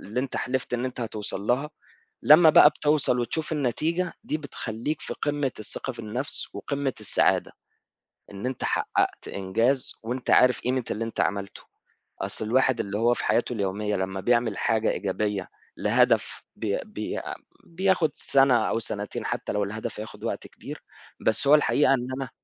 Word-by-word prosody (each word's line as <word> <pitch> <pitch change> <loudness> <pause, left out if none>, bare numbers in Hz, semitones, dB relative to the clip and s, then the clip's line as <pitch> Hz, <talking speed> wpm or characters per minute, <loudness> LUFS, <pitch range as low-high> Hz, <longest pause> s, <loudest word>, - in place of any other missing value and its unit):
اللي 110 +5 -3
أنت 135 0 -4
حلِفت 130 -1 -2
إن 120 +1 -2
أنت 130 -1 -4
هتوصَل 110 -4 -3
لها، 125 +8 0 0.5
لمّا 160 +2 +8
بقى 150 - +8
بتوصَل 150 -4 +1
وتشوف 155 +7 0
النتيجة، 160 +6 -1
دي 155 - -1
بتخلّيك 145 0 -5
في - - -6
قِمّة 145 -2 -1
الثقة 110 +4 -3
في 120 - -14
النَفْس 120 +5 -2
وقِمّة 140 -2 -2
السعادة، 105 - +2 0.8
إن 100 +4 -6
أنت 130 0 -4
حقّقت - - -1
إنجاز 115 +8 0
وأنت 125 +3 -3
عارف 125 0 +5
قيمة 125 0 -1
اللي 115 - -2
أنت 115 - -5
عملته. 100 -1 -2 0.6
أصل - - 0
الواحد 130 +2 +2
اللي 100 +1 -3
هو 120 +2 +3
في - - -4
حياته 120 - +1
اليومية 105 0 -1
لمّا 95 0 -3
بيعمل 120 0 +1
حاجة 110 0 +1
إيجابية، 100 0 -2 0.3
لهدف - - +2
بي - - -1
بي - - -5 0.5
بياخد 175 -2 +1
سَنة 135 -2 +3
أو - - 0
سَنتين 105 -2 -3
حتى - - -3
لو 105 0 0
الهدف 105 +1 -5
هياخد 110 - -9
وقت - - -3
كبير، - - -10 0.4
بس 110 +5 +2
هو 150 - +8
الحقيقة 145 -2 +4
إن 125 -2 -2
أنا 130 -3 -5
120 Hz, 160 wpm, -26 LUFS, 105-140 Hz, 0.8 s, لمّا